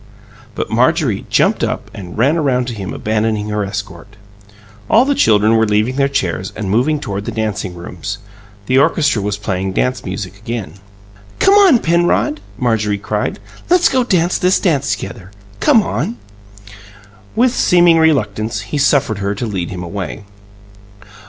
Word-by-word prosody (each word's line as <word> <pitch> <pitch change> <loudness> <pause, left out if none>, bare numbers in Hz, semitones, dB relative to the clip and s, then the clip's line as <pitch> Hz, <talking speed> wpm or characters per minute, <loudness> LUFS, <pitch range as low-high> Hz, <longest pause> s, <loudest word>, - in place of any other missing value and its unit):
But - - -4
Marjorie - - +1
jumped - - +2
up - - -3
and 90 -2 -9
ran 135 +8 +3
around 130 -6 +1
to - - -4
him 100 -3 -6
abandoning 110 -1 -1
her 105 0 -1
escort. 100 -1 -7 0.7
All 235 +4 +5
the 285 - +2
children 110 - +3
were 110 0 +2
leaving 105 +5 +1
their 140 0 +2
chairs 95 - -2
and 100 -3 -4
moving 140 +8 +2
toward 100 -6 -5
the - - -3
dancing 105 -4 -3
rooms; 90 +4 -6 0.5
the 130 +5 +3
orchestra 145 -5 +2
was 100 0 -2
playing 95 -2 -3
dance 125 +5 -1
music 95 0 -6
again. 115 -1 -5 0.6
"Come 390 - +4
on, 395 -9 +6
Penrod!" 175 - +1 0.2
Marjorie 110 -4 0
cried. 105 +1 -3 0.3
"Let's 355 0 +4
go 260 -1 +2
dance 180 -6 +1
this 180 +1 +3
together. 140 - -2 0.3
Come 220 - +4
on!" 120 - -3 1.2
With 245 +2 +3
seeming 175 -6 +4
reluctance, 115 -9 +1
he 110 +8 -4
suffered 140 -7 +2
her 100 +1 -2
to 120 - -3
lead 95 -6 -3
him 90 -1 -6
away. 90 -7 -6
110 Hz, 150 wpm, -16 LUFS, 100-150 Hz, 1.2 s, on